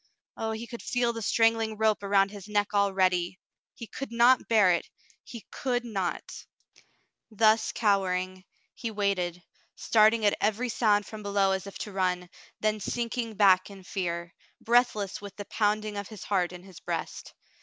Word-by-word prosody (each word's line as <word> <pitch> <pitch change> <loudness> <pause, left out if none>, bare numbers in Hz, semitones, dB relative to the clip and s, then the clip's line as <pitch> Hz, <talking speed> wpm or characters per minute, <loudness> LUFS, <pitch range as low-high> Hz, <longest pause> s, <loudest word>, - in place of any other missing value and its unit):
Oh, 225 - -3
he 220 +1 -5
could 235 0 -9
feel 245 -2 0
the 230 - -6
strangling 225 0 +2
rope 220 -1 +2
around 195 0 +2
his 205 -1 -10
neck 210 0 0
already! 185 -3 +1 0.4
He 230 - -8
could 270 +3 -7
not 240 +2 +4
bear 210 -5 +5
it 170 - -1 0.2
— - - -31
he 235 -5 -9
could 245 -2 -2
not! 195 -6 -4 0.9
Thus 220 0 +3
cowering, 185 -3 0 0.3
he 235 - -5
waited, 190 -5 -1 0.3
starting 220 0 +3
at 205 - +4
every 220 +4 0
sound 210 -3 +2
from 215 -1 -9
below 200 -1 +1
as 190 0 -2
if 200 - -8
to 210 - -6
run, 180 -2 -1 0.3
then 215 0 +1
sinking 230 +2 -3
back 195 -2 +4
in 195 -1 -12
fear, 170 -2 -4 0.3
breathless 225 -5 +1
with 200 -1 -9
the 205 - -7
pounding 210 0 -1
of 200 - -4
his 215 -4 -10
heart 185 -4 0
in 180 0 -10
his 190 -2 -13
breast. - - -5
205 Hz, 165 wpm, -28 LUFS, 190-225 Hz, 0.9 s, bear